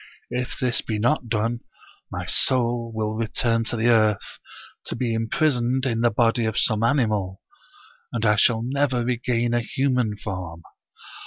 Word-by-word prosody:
If 125 +1 -3
this 125 -3 +1
be 110 - -3
not 120 +2 0
done, 115 +2 -1 0.5
my - - -4
soul 120 -2 +2
will 110 -1 -2
return 115 +1 0
to 115 - -3
tike 110 - -1
earth, 110 -3 +2 0.5
to - - -3
be 120 -3 -1
imprisoned 125 +2 0
in 115 -3 0
the 120 - +4
body 115 +1 +1
of 110 -1 -2
some 110 -2 +3
animal, 110 -7 0 0.7
and 115 -2 -2
I 105 -1 +4
shall 110 +2 +3
never 130 -1 0
regain 120 -1 0
a 120 - +2
human 125 -3 -1
form. 90 -5 -6
115 Hz, 155 wpm, -23 LUFS, 110-125 Hz, 0.7 s, the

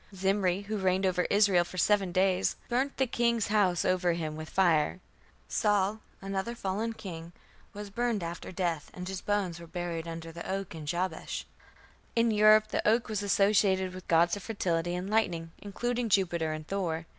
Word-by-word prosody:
Zimri, 190 -1 +1
who 210 +1 -4
reigned 190 0 +1
over 180 -1 +1
Israel 200 -4 +4
for 185 - -10
seven 195 0 +2
days, 185 +1 +2
"burnt 260 +3 -1
the 265 - +3
king's 235 -3 +1
house 195 -5 +2
over 180 -1 +2
him 160 -2 -3
with 155 0 -7
fire". 175 -2 +2 0.5
Saul, 205 0 +1 0.2
another 195 +4 -3
fallen 215 +2 -2
king, 170 -5 -8 0.4
was 205 0 -8
burned 235 -2 -1
after 170 +2 -6
death, 175 -4 -2
and 180 0 -6
his 190 0 -4
bones 195 -5 -1
were 170 - -10
buried 170 -1 -4
"under 165 0 -6
the 170 +1 -8
oak 195 -1 -3
in 155 -2 -8
Jabesh". 175 +1 -3 0.7
In 230 0 +3
Europe 215 0 +6
the - - 0
oak 230 +2 +3
was 210 -2 -1
associated 195 -2 +2
with 185 0 -10
gods 170 +2 +4
of 205 - -7
fertility 175 -5 -1
and 180 +1 -4
lightning, 175 -6 0
including 240 +3 -2
Jupiter 170 -5 +1
and 155 0 -6
Thor. 170 -5 -2
190 Hz, 175 wpm, -29 LUFS, 170-210 Hz, 0.7 s, Europe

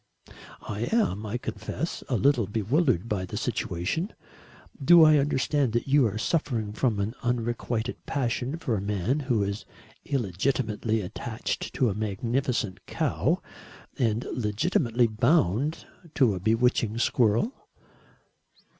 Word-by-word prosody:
"I 105 +3 -3
am, 110 - +1
I 110 +4 -2
confess, - - -4
a - - +1
little 130 -6 +3
bewildered 115 - +1
by 105 -5 -1
the 90 - -5
situation. 160 - -2 0.7
Do 170 +3 +8
I 155 -1 +7
understand 140 -2 +1
that 120 - 0
you 140 -2 +4
are 105 0 -4
suffering 115 -5 -1
from 110 -2 0
an 100 +3 -1
unrequited 120 0 -2
passion 130 +2 -1
for 125 -8 -1
a 100 - -2
man 105 - 0
who 125 -7 +1
is 100 +1 -3 0.4
illegitimately 110 -1 -1
attached 110 +5 -4
to 125 -6 +2
a - - -2
magnificent 110 +1 -2
cow - - 0 0.5
and 115 -1 0
legitimately 120 - +1
bound 120 - +1 0.3
to 125 -7 +4
a 95 - -4
bewitching 115 +2 +1
squirrel?" 120 - +2
115 Hz, 125 wpm, -27 LUFS, 105-135 Hz, 0.7 s, Do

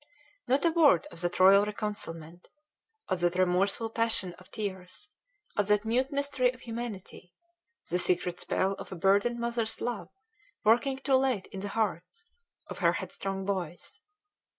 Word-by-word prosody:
Not 270 +6 +2
a 335 - +4
word 320 -3 +5
of 165 - -6
that 175 0 -2
royal 195 +2 +7
reconcilement, 180 -6 -5 0.6
of 185 -2 -1
that 175 0 +1
remorseful 190 +5 +1
passion 225 -6 +1
of 185 - -18
tears, 195 0 -6 0.4
of 205 -2 +1
that 210 +1 +2
mute 255 +5 +1
mystery 280 -3 +1
of 255 0 -17
humanity, 225 -7 -7 0.5
the 180 - 0
secret 180 0 0
spell 190 +1 0
of - - -9
a - - -4
burdened 200 +7 +2
mother's 235 -1 -2
love 240 -3 -3 0.5
working 245 +5 +3
too 270 0 +2
late 260 -7 +1
in 195 - -6
the 200 - -4
hearts, 195 - -3 0.4
of - - -8
her - - +3
headstrong 195 -1 -4
boys! 180 -4 -4
205 Hz, 150 wpm, -29 LUFS, 185-240 Hz, 0.6 s, royal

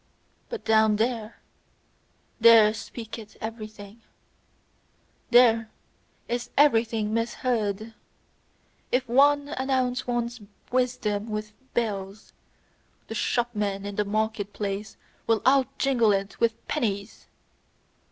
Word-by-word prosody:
But 470 -3 -6
down 220 -1 +4
there 225 0 -2 1.0
there 225 -2 +7
speaketh 225 -1 -9
everything, 215 -1 -8 1.3
there 230 -2 +5 0.6
is 240 0 -3
everything 225 -6 +3
misheard. 230 -2 -1 1.0
If 250 0 +1
one 285 +4 +4
announce 260 -3 -1
one's 240 -1 -2 0.3
wisdom 230 -4 0
with 215 0 -4 0.2
bells, 205 -3 -3 0.8
the - - -4
shopmen 210 -4 -1
in 205 0 -5
the 210 - +1
market 215 0 -2
place 205 +1 -4 0.3
will 225 -2 +2
out 265 0 +5
jingle 240 -6 +3
it 195 +1 -3
with 230 -1 0
pennies! 205 -7 -3
225 Hz, 95 wpm, -26 LUFS, 210-245 Hz, 1.3 s, there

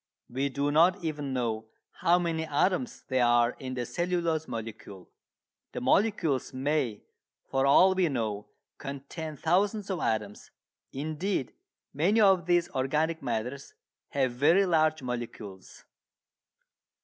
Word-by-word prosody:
We 135 +3 -1
do 140 +2 -1
not 175 +5 +4
even 150 -4 -3
know 115 -4 -2 0.3
how 175 +1 +4
many 165 -2 -1
atoms 185 - 0
there 130 -2 +2
are 120 0 +4
in 130 -1 -5
the 125 -1 -2
cellulose 170 0 -1
molecule. 110 -5 -8 0.7
The - - -3
molecules 170 - +1
may, 130 -5 -1 0.5
for 135 0 +2
all 185 +7 +6
we 185 -3 +2
know, 110 -6 -3 0.3
contain 140 +3 -7
thousands 200 +5 +1
of 185 - -2
atoms. 105 -5 -2 0.4
Indeed 155 +1 -3 0.4
many 180 +10 +2
of 190 -5 +4
these 175 -1 +3
organic 155 +5 0
matters 125 +4 -4 0.3
have 130 -3 0
very 160 +10 +4
large 155 -4 +2
molecules. 115 -6 -7
145 Hz, 125 wpm, -28 LUFS, 125-175 Hz, 0.7 s, all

